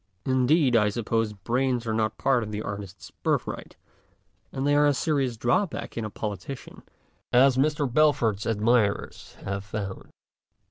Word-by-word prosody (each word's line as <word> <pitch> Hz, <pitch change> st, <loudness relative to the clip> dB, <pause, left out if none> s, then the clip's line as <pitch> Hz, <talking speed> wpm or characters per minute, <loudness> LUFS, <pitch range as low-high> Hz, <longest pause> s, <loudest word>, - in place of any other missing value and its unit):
In 130 Hz, -1 st, +2 dB
deed, 145 Hz, -4 st, +4 dB
I 105 Hz, -2 st, +4 dB
suppose 115 Hz, 0 st, -1 dB
brains 120 Hz, +4 st, -1 dB
are 110 Hz, -1 st, +1 dB
part 135 Hz, 0 st, +1 dB
of 110 Hz, -, -5 dB
the 105 Hz, +1 st, -4 dB
artist's 100 Hz, -2 st, -7 dB
birthright, -, -, -3 dB, 0.8 s
and 135 Hz, +1 st, -3 dB
they 145 Hz, -, +3 dB
are 145 Hz, 0 st, +5 dB
a 145 Hz, -, +2 dB
serious 135 Hz, -5 st, 0 dB
drawback 120 Hz, -, -1 dB
in 115 Hz, -, -3 dB
a -, -, -4 dB
politician, 105 Hz, +5 st, -6 dB, 0.5 s
as 130 Hz, +1 st, +5 dB
Mr. 150 Hz, +2 st, +1 dB
Balfour's 120 Hz, -7 st, +2 dB
admirers 110 Hz, -1 st, 0 dB
have 100 Hz, 0 st, -3 dB
found. 100 Hz, -1 st, -6 dB
120 Hz, 145 wpm, -26 LUFS, 105-135 Hz, 0.8 s, are